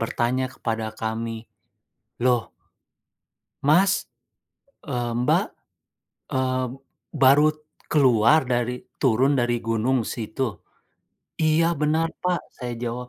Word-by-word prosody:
bertanya 120 +3 0
kepada 115 -3 -3
kami, 115 0 -4 0.8
"Loh" 125 -2 +3 1.2
"Mas, 185 +8 +3 0.7
eee, 120 -5 -2
Mbak, 125 +1 +2 0.9
eee, 130 0 0 0.5
baru 140 +1 +5 0.4
keluar 130 0 +4
dari 125 0 -1 0.2
turun 135 +3 +2
dari 120 -2 +1
gunung 115 +2 0
situ?" 115 0 -4 0.7
"Iya 160 +2 +2
benar, 155 +2 0
Pak." 180 -1 +1 0.2
Saya 125 -2 -5
jawab, 120 +1 -4
125 Hz, 90 wpm, -24 LUFS, 115-145 Hz, 1.2 s, baru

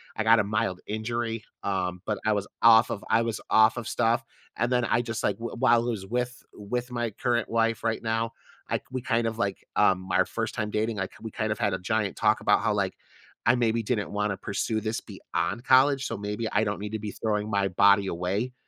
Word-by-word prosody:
I 110 - -1
got 115 +1 +6
a - - +3
mild 105 -2 -1
injury, 115 +1 -3 0.2
um, 90 -2 -2
but 105 -1 0
I 110 - +3
was 100 -1 -1 0.2
off 115 0 +7
of 100 - -4
I 115 - +3
was 115 -2 -2
off 110 +3 +5
of 120 - -4
stuff, 115 +3 +1 0.3
and 120 +2 0
then 125 -1 +2
I 120 0 +2
just 115 -2 -4
like 100 - +1
w 115 +1 -6
while 120 -2 +4
was 105 -5 -3
with 125 +3 -2 0.2
with 120 +4 -4
my 120 -2 -2
current 120 +2 -1
wife 115 0 +1
right 115 -1 0
now, 115 0 -1 0.4
I - - 0
we 130 -1 -3
kind 115 -3 +1
of 110 0 -3
like, 100 -4 -2
um, 95 0 +2
our 90 +1 +4
1st - - -4
time 105 0 -2
dating, 110 0 -1
I 95 - -1
we 110 - -5
kind 110 0 -2
of 105 - -2
had - - +1
a - - 0
giant 105 0 -1
talk - - +2
about - - +3
how - - +1
like, - - -1 0.5
I 120 - +6
maybe 115 -1 +1
didn't 105 -2 -1
wanna 105 -1 -1
pursue 110 +2 -2
this 110 +1 -2
beyond 120 - -4
college, 135 +1 +5
so - - -4
maybe 105 +2 -3
I 105 - +2
don't 105 -2 -2
need 105 +1 -6
to 110 - -2
be 105 -1 -5
throwing 105 0 -2
my 100 -2 +1
body 100 +2 +4
away, 95 +8 -2
110 Hz, 230 wpm, -27 LUFS, 105-115 Hz, 0.5 s, off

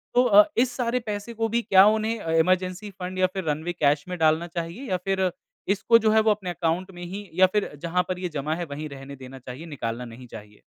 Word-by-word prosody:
तो 245 - +6
अ, 210 -4 +7
इस 245 +1 +3
सारे 245 0 0
पैसे 210 +2 -4
को 225 0 -1
भी 235 +2 +1
क्या 195 -3 +6
उन्हें 220 +1 +1
अ, 165 -5 -4
इमरजेंसी 185 +3 0
फंड 185 +1 -5
या 185 - +4
फिर 190 -2 -3
रनवे 160 +4 -2
कैश 145 -3 +1
में 180 - -4
डालना 160 +1 +2
चाहिए 170 +9 -6
या 185 - +1
फिर 190 -2 +1 0.4
इसको 230 +3 +4
जो 220 -1 +2
है 220 - +5
वो 220 0 +3
अपने 195 -3 -2
अकाउंट 175 +2 -1
में 175 0 -9
ही 195 +3 -7
या 185 +3 +6
फिर 210 -1 +1
जहाँ 180 +2 0
पर 185 - -2
ये 180 -1 -3
जमा 155 0 -2
है 175 0 -4
वहीं 150 +2 -5
रहने 140 0 -9
देना 130 0 -11
चाहिए, 130 +6 -9
निकालना 125 -6 -4
नहीं 120 +1 -11
चाहिए? 105 -2 -11
180 Hz, 240 wpm, -25 LUFS, 155-205 Hz, 0.4 s, अ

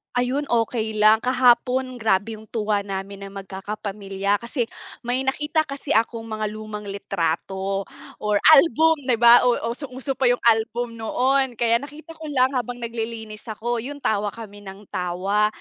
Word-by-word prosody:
Ayun 250 +4 0
okey 225 -3 -1
lang 215 +1 +5
kahapon 255 0 +3
grabe 220 -1 0
yung 215 - -12
tuwa 210 -2 -1
namin 195 0 -6
na 195 - -8
magkakapamilya 200 0 -3
kasi 235 0 -2 0.4
may 250 +2 +1
nakita 295 +4 0
kasi 275 -3 -3
akong 225 0 0
mga 215 -1 -3
lumang 215 -1 -7
litrato 195 0 -2 0.3
or 210 -1 0 0.2
album, 320 +1 +5
'di 250 - +4
'ba 235 +1 +8
o 245 - +4 0.2
usong-uso 260 +1 -5
pa 260 - +4
yung 245 0 +1
album 230 +1 +1
noon 260 +3 +1
kaya 230 0 +2
nakita 295 +4 -11
ko 320 -1 -9
lang 260 -2 +2
habang 245 -1 -3
naglilinis 225 -2 -5
ako 240 +2 -2
'yun 285 +4 -7
tawa 205 -1 +1
kami 210 -3 -10
ng 195 0 -11
tawa. 185 +4 0
225 Hz, 155 wpm, -23 LUFS, 205-255 Hz, 0.4 s, ba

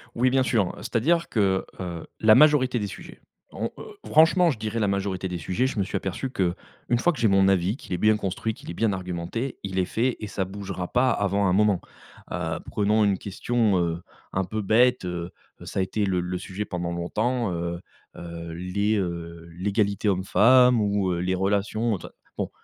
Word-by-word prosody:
Oui 125 +2 +3
bien 130 0 +3
sûr, 110 -7 +1
c'est-à-dire 150 +8 0
que, 95 -4 +1
heu, 85 -3 -6
la 110 0 +6
majorité 145 -5 +5
des 105 - -2
sujets, - - -11 0.3
on, - - -3
heu, - - -9 0.2
franchement 165 +3 +5
je 120 - -6
dirais 110 +1 -3
la 105 - +1
majorité 95 -1 -2
des 90 - -3
sujets 90 +10 0
je 125 - -3
me - - +3
suis 100 - -6
aperçu 95 +7 -3
qu'une 95 -8 0 0.5
fois 175 +7 +2
que - - -9
j'ai 115 - +4
mon 95 0 +4
avis, 95 +3 +2
qu'il 95 - -8
est 90 - 0
bien 110 +3 +3
construit, 105 +2 -2
qu'il - - -12
est - - -4
bien 110 +4 +1
argumenté, 90 +7 -4
il 95 -1 -2
est 90 - +2
fait 120 +6 0
et 105 - -5
ça 100 -2 -2
bougera 95 -2 -6
pas 125 +1 +3
avant 100 0 +1
un 90 - +2
moment. 105 -2 +3 0.5
Heu, 80 -2 -2
prenons 105 +1 +2
une 100 -2 +2
question, 105 +2 0
heu, 85 -1 -1 0.3
un 95 - +1
peu 110 +3 -3
bête, 120 +2 +3
heu, 90 0 -4 0.3
ça - - -4
a - - +3
été 105 +2 -1
le 95 -2 0
le 90 +1 -3
sujet 95 +3 -5
pendant 90 -1 -3
longtemps, 110 +6 -1
heu 85 0 -3 0.4
heu, 85 -1 -7
les, 100 +5 -1
heu, 85 -2 -4
l'égalité 100 +3 0
homme-femme 120 +6 +5
ou 100 -2 +1
heu, 85 - -2
les 95 +1 0
relations, 100 +3 0
tout - - -10
ça, - - -16 0.2
bon. - - -2
100 Hz, 205 wpm, -25 LUFS, 90-110 Hz, 0.5 s, la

